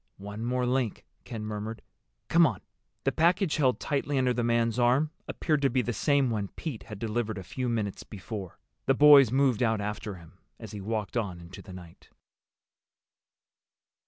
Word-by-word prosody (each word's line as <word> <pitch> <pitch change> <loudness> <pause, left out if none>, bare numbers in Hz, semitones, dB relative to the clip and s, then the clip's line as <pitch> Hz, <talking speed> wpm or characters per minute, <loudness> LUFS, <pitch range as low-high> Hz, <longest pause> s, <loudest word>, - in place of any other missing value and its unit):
"One 100 +3 -7
more 125 +1 0
link," 125 -3 -1 0.2
Ken 110 -2 -6
murmured. 110 +1 -5 0.4
"Come 170 -1 +5
on." 105 -9 -4 0.4
The - - +2
package 175 +1 +2
held 130 -4 +2
tightly 145 -1 -1
under 130 -1 +2
the 120 0 -1
man's 115 0 +1
arm 130 +6 +3 0.2
appeared 155 -3 0
to 135 - +3
be 130 -2 +1
the 120 - -2
same 140 +2 +2
one 105 -3 -1
Pete 145 -9 -5
had 105 - -8
delivered 110 0 -2
a 95 - -6
few 125 +7 -3
minutes 110 -4 -2
before. 100 -2 -8 0.3
The 135 - +4
boys 145 -4 +8
moved 130 -4 +2
out 110 -3 +2
after 105 0 -4
him 85 +1 -16 0.2
as 110 -4 -9
he 105 - -7
walked 105 0 -3
on 95 -6 -2
into 85 +2 -11
the 95 - -12
night. 90 -2 -13
115 Hz, 175 wpm, -28 LUFS, 105-130 Hz, 0.4 s, boys